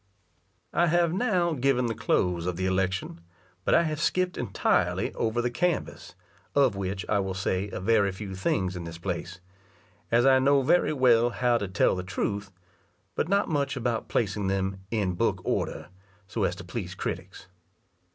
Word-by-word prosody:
I 175 - +3
have 170 0 +2
now 185 -5 +1
given 130 -2 +1
the 115 - -1
close 90 -4 0
of 90 - -1
the 95 +2 -2
election, 95 -2 -1 0.4
but - - +3
I - - +5
have 155 -2 -2
skip'd 180 +2 +1
entirely 115 -6 0
over 115 +1 -1
the 125 - 0
canvass, 175 +7 -2 0.4
of 135 -7 +4
which 95 0 -4
I 105 - +2
will 95 -1 -2
say 95 +1 -1
a - - -5
very 100 0 +3
few 95 0 -7
things 95 0 -1
in 90 - -5
this 85 0 -7
place; 90 0 -5 0.7
as 120 +2 +4
I 135 -1 +6
know 140 +1 +4
very 155 +6 +3
well 120 -4 +4
how 120 0 +1
to 100 - -3
tell 95 - +2
the 90 - -3
truth, 100 +1 -3 0.6
but 165 - -1
not 200 +1 +2
much 140 -3 -1
about 120 -2 -2
placing 105 -2 0
them 95 0 -1
in 100 -5 0
book 85 - 0
order, - - -2 0.4
so 95 - -1
as - - -1
to - - -9
please - - -5
critics. - - -5
110 Hz, 175 wpm, -27 LUFS, 95-135 Hz, 0.7 s, I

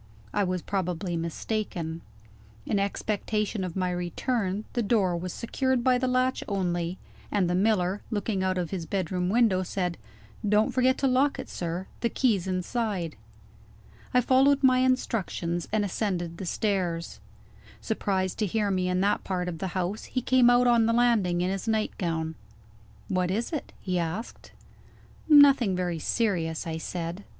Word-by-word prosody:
I 205 - +2
was 185 -2 -2
probably 180 -2 -2
mistaken. 170 -1 -3 0.6
In 205 - 0
expectation 210 +1 -1
of 180 -2 -5
my 185 -1 0
return, 190 +3 -2
the 240 - 0
door 200 -5 +2
was 175 +1 -4
secured 260 +3 -1
by 250 0 +4
the 255 - 0
latch 255 +1 +1
only; 180 -3 -1 0.3
and 195 -4 +2
the 175 - 0
miller, 190 0 +1
looking 205 -3 -1
out 185 0 0
of 175 -3 -2
his 175 -4 -4
bedroom 180 0 -1
window, 215 -4 +3
said: 180 -2 -2 0.4
"Don't 210 +1 +3
forget 255 0 +3
to 275 - +1
lock 265 +2 +2
it, - - -7
sir; 175 +2 -4
the 235 - 0
key's 215 -10 +1
inside." 185 -2 -2 1.0
I 250 - +4
followed 270 +3 +4
my 255 -1 +5
instructions, 215 -9 0
and 210 -1 +1
ascended 175 -4 -2
the 190 - -5
stairs. 180 -5 -1 0.6
Surprised 190 -4 -1
to 210 - +1
hear 205 +1 0
me 185 -1 0
in 180 0 +1
that 200 +1 +1
part 180 -2 -2
of 165 -2 -4
the 190 - -2
house, 185 +4 -2
he 255 - -3
came 255 -2 +5
out 245 0 +5
on 235 -2 +4
the 230 - +2
landing 220 -8 +3
in 180 +1 0
his 195 +3 -4
nightgown. 170 -7 -1 0.7
"What 180 -1 0
is 225 - -2
it?" 305 - -4
he 180 -2 -1
asked. 175 +7 -5 0.8
"Nothing 280 -9 +7
very 175 -2 -2
serious," 170 -5 0
I 160 -1 -3
said. 175 +3 -5
195 Hz, 160 wpm, -27 LUFS, 180-230 Hz, 1.0 s, Nothing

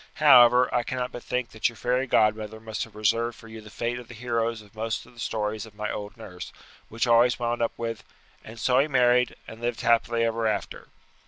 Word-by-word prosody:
However, 125 -4 +7
I 120 - +2
cannot 125 +1 -4
but 120 - -8
think 125 -1 -3
that 110 - 0
your 120 - -13
fairy 125 +3 0
godmother 110 -1 +1
must 110 -1 -4
have 115 - -19
reserved 115 +2 0
for 115 - -14
you 110 0 -10
the 110 - -13
fate 120 +3 -3
of 120 - -12
the 120 - -11
heroes 115 -1 -2
of 100 - -21
most 110 +1 -3
of - - -18
the 120 - -17
stories 110 -1 -3
of 105 - -17
my 105 0 -3
old 105 +2 -7
nurse, 90 -5 -9 0.4
which 115 +3 -1
always 120 0 +4
wound 120 0 -2
up 115 - 0
with 115 -3 -4 0.4
'and 115 +1 -11
so 125 +3 +3
he 140 - +3
married, 125 -3 +3
and 110 +1 -11
lived 120 -1 -2
happily 115 0 +2
ever 115 0 0
after.' 105 -2 -3
115 Hz, 225 wpm, -26 LUFS, 110-120 Hz, 0.4 s, However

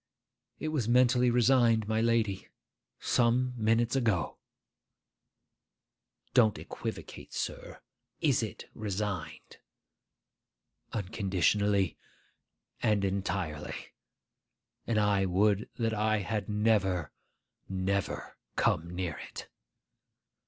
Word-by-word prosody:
'It 155 - -3
was 135 -8 -1
mentally 125 0 +5
resigned, 120 -2 +4
my 110 0 +1
lady, 115 -4 +1 0.5
some 125 +1 +2
minutes 115 +2 +2
ago.' 110 - 0 1.9
Don't 110 -5 +5
equivocate, - - -7
sir. - - -4 0.4
Is - - +3
it - - -6
resigned?' 105 -3 -4 1.3
'Unconditionally 100 -1 +1 0.8
and 105 -2 +2
entirely; 90 -6 -3 0.9
and 115 - +1
I 100 -2 +3
would 100 +3 +2
that 115 -2 0
I 110 0 +2
had 105 +1 -3
never, 100 -7 +1 0.6
never 95 +1 -2 0.2
come 85 +2 +1
near 90 -4 -3
it! - - -9
105 Hz, 85 wpm, -30 LUFS, 95-115 Hz, 1.9 s, mentally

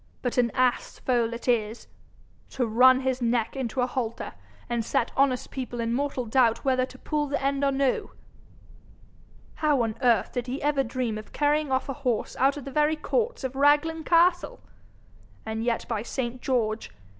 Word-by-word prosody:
But 250 0 0
an 240 -1 +3
ass 255 -1 +1
foal 240 -3 0
it 235 +2 -7
is! 225 -2 0 0.6
To 255 - -1
run 255 +4 +5
his 260 -1 -1
neck 235 0 0
into 255 -1 -2
a - - +3
halter, 245 -3 -4 0.3
and 235 -1 -1
set 230 - 0
honest 265 -2 +1
people 245 -2 -5
in 230 0 -1
mortal 270 -1 -1
doubt 230 +1 +2
whether 255 -1 +2
to 260 - -14
pull 295 +2 -2
the 285 +1 -1
end 275 +1 0
or 280 - +3
no! 270 -1 0 1.5
How 295 -5 +3
on 225 -1 -1
earth 235 -6 +3
did 245 -1 -3
he 260 +3 -3
ever 290 -2 +2
dream 235 -3 -3
of 215 - -13
carrying 295 -1 +1
off 260 0 0
a 275 - -3
horse 245 -4 -1
out 275 +2 +2
of 285 - -8
the 275 - -6
very 300 +3 +2
courts 470 - -1
of 260 0 -4
Raglan 295 +3 +3
castle! 345 +2 +3 0.9
And 220 0 -3
yet, 235 -1 -1
by 225 -3 -2
saint 245 +1 -4
George! 230 -4 -1
255 Hz, 180 wpm, -26 LUFS, 235-280 Hz, 1.5 s, run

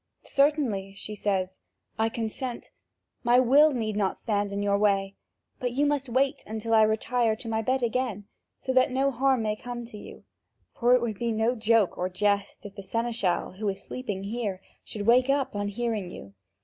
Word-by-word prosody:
"Certainly," 265 -10 +1
she 210 - -6
says, 190 -2 -2 0.4
"I 225 0 +2
consent. 235 +2 -5 0.5
My 240 +1 +5
will 275 +5 +6
need 220 -5 -2
not 200 -2 0
stand 205 -2 -1
in 200 0 -2
your 200 0 +2
way; 195 -2 +2 0.5
but 245 -1 -2
you 285 +3 +2
must 285 -3 0
wait 265 +3 +1
until 220 +1 -3
I 220 - +7
retire 220 +1 +2
to 225 - -9
my 220 0 0
bed 255 +3 0
again, 235 -4 -1 0.3
so 260 - -3
that 255 0 +4
no 270 +2 +1
harm 260 -1 +2
may 210 -1 0
come 240 +1 -7
to 220 -3 -10
you, - - -12 0.5
for 245 +1 +4
it 250 - +1
would 220 -4 -3
be 235 -1 0
no 225 +2 +1
joke 225 -3 +2
or 180 +1 0
jest 200 +2 -1
if 200 - -8
the 200 - -8
seneschal, 225 -2 -1
who 215 -2 0
is 195 0 -5
sleeping 205 -7 -5
here, 205 -2 -3 0.2
should 205 -2 -6
wake 250 +3 +5
up 275 -5 +1
on 205 0 -1
hearing 215 -3 -2
you. 100 - -10
225 Hz, 190 wpm, -27 LUFS, 205-250 Hz, 0.5 s, I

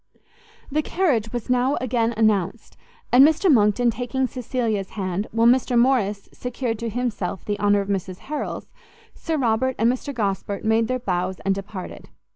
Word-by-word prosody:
The 305 +2 +1
carriage 280 - 0
was 240 -2 -4
now 250 +2 +2
again 235 -2 0
announced, 215 -1 0 0.4
and 250 +2 +8
Mr 320 +3 +4
Monckton 230 +1 +3
taking 245 +3 -2
Cecilia's 235 -6 -2
hand, 190 +1 -2
while 230 +1 +2
Mr 245 0 +4
Morrice 235 -5 +2
secured 245 -2 -3
to 230 - -3
himself 220 -6 -3
the 205 -1 -2
honour 205 0 +3
of 195 - -6
Mrs 190 -2 -3
Harrel's, 300 +6 -5 0.5
Sir 325 -2 -3
Robert 255 0 +1
and 230 +3 +3
Mr 270 +3 -5
Gosport 200 -4 -3
made 220 +1 +2
their 255 - 0
bows 185 -5 -2
and 195 - +1
departed. 195 -1 -8
230 Hz, 160 wpm, -23 LUFS, 205-255 Hz, 0.5 s, and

